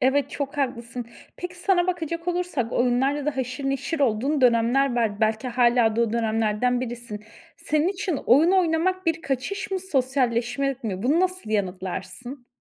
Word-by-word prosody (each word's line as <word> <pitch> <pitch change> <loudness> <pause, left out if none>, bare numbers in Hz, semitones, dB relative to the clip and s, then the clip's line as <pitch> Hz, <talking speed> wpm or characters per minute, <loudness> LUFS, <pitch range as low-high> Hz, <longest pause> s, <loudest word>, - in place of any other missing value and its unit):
Evet, 270 +1 +2
çok 285 0 -4
haklısın. 245 -3 -3 0.3
Peki, 355 0 -6
sana 360 -1 +2
bakacak 335 -1 -3
olursak 350 -10 -1
oyunlarla 265 +4 +1
da 300 -3 -1
haşır 255 +1 -3
neşir 275 +4 -2
olduğun 270 +4 +1
dönemler 245 +2 +3
var. 220 -2 0
Belki 220 +3 +1
hâlâ 240 -2 +3
da - - +2
o 230 -2 +1
dönemlerden 225 +1 +1
birisin. 235 -4 -6 0.3
Senin 305 +2 +1
için 375 -4 -2
oyun 295 +8 +6
oynamak 370 0 +1
bir 325 0 0
kaçış 280 +10 -3
mı, 385 - 0
sosyalleşme 265 -4 0
mi? 195 -4 -3
Bunu 290 +8 +3
nasıl 370 -10 -1
yanıtlarsın? 210 +6 -4
260 Hz, 150 wpm, -24 LUFS, 235-320 Hz, 0.3 s, oyun